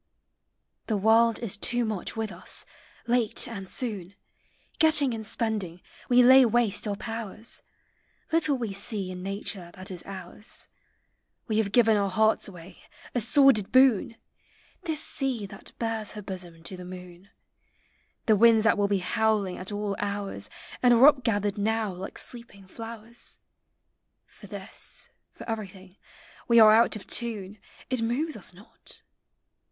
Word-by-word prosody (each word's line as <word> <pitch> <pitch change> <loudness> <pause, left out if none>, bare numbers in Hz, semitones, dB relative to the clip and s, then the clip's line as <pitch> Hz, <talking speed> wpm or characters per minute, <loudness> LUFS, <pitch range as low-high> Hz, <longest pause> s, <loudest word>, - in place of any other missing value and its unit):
The 215 - 0
World 225 +2 +4
is 220 -5 -1
too 240 +3 +1
much 215 -4 -3
with 220 -2 -2
us; - - -3 0.4
late 235 -2 +1
and 195 -5 -7
soon. 200 -6 -2 0.6
Getting 305 -5 +4
and 220 -1 -5
spending, 210 -6 -3 0.3
we 250 0 +6
lay 260 +2 +8
waste 230 -3 +1
our 205 - -1
powers; 225 0 -6 0.7
Little 315 -4 +2
we 230 -5 -3
see 195 -1 -2
in 180 0 -7
nature 195 -2 -5
that 185 +1 -7
is 180 -2 -5
ours; 195 +3 -7 0.8
We 220 -2 +1
have 205 -3 0
given 225 -2 +5
our 200 -1 +1
hearts 220 +3 +2
away, 180 -2 -12 0.3
a 245 - +1
sordid 240 -3 +5
boon! 255 -4 +4 0.7
This 320 -2 -1
sea 260 -6 -1
that 195 - -10
bares 225 -2 -2
her 210 -1 -8
bosom 180 -4 -7
to 185 - -4
the 180 - -9
moon; 180 +1 -11 1.0
The 220 - +5
winds 225 +1 +6
that 220 -2 +3
will 200 - +3
bo 200 0 +1
howling 205 0 0
at 185 +3 -4
all 205 -1 -2
hours. 200 -1 -3 0.3
And 245 -1 +6
are 240 +3 +7
up 275 -4 +4
gathered 205 -2 0
now 220 -1 0
like 185 +2 -8
sleeping 235 -5 -6
flowers; 225 +3 -8 0.9
For - - -15
this, - - -6 0.2
for - - -12
everything, 195 -4 -6 0.5
we 235 -1 +6
are 215 -1 +9
out 230 +2 +6 0.2
<>!' - - -32
tune; 215 -4 -2 0.3
It 255 -2 0
moves 275 +8 -1
us 195 - -5
not. 200 +6 -10
215 Hz, 150 wpm, -27 LUFS, 195-235 Hz, 1.0 s, are